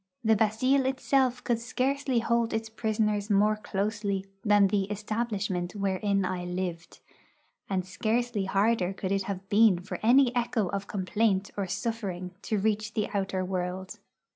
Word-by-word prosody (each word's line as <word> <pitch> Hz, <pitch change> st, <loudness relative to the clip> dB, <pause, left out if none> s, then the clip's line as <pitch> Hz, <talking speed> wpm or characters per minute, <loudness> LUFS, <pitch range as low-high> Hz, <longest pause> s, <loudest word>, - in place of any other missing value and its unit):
The 220 Hz, -1 st, +4 dB
Bastille 255 Hz, +6 st, +2 dB
itself 265 Hz, -1 st, +1 dB
could 235 Hz, -2 st, 0 dB
scarcely 260 Hz, +3 st, -1 dB
hold 235 Hz, 0 st, +1 dB
its 220 Hz, 0 st, -3 dB
prisoners 215 Hz, -2 st, 0 dB
more 210 Hz, +1 st, +4 dB
closely 200 Hz, -1 st, -2 dB, 0.2 s
than 205 Hz, -2 st, +5 dB
the 195 Hz, 0 st, 0 dB
'establishment' 205 Hz, -3 st, -2 dB
wherein 195 Hz, 0 st, 0 dB
I 180 Hz, -1 st, -2 dB
lived; 180 Hz, -1 st, -5 dB, 0.7 s
and 185 Hz, -2 st, -1 dB
scarcely 220 Hz, +2 st, -1 dB
harder 195 Hz, -1 st, +1 dB
could 190 Hz, -1 st, -4 dB
it 195 Hz, -1 st, 0 dB
have 195 Hz, -1 st, -5 dB
been 210 Hz, -2 st, +5 dB
for 180 Hz, -, -6 dB
any 250 Hz, +2 st, +5 dB
echo 235 Hz, -5 st, 0 dB
of 200 Hz, 0 st, -3 dB
complaint 195 Hz, 0 st, 0 dB
or 200 Hz, -2 st, -2 dB
suffering 195 Hz, -3 st, -3 dB
to 215 Hz, -, -1 dB
reach 215 Hz, +1 st, -1 dB
the 210 Hz, -, 0 dB
outer 190 Hz, -2 st, -1 dB
world. 185 Hz, 0 st, -4 dB
205 Hz, 145 wpm, -28 LUFS, 190-225 Hz, 0.7 s, than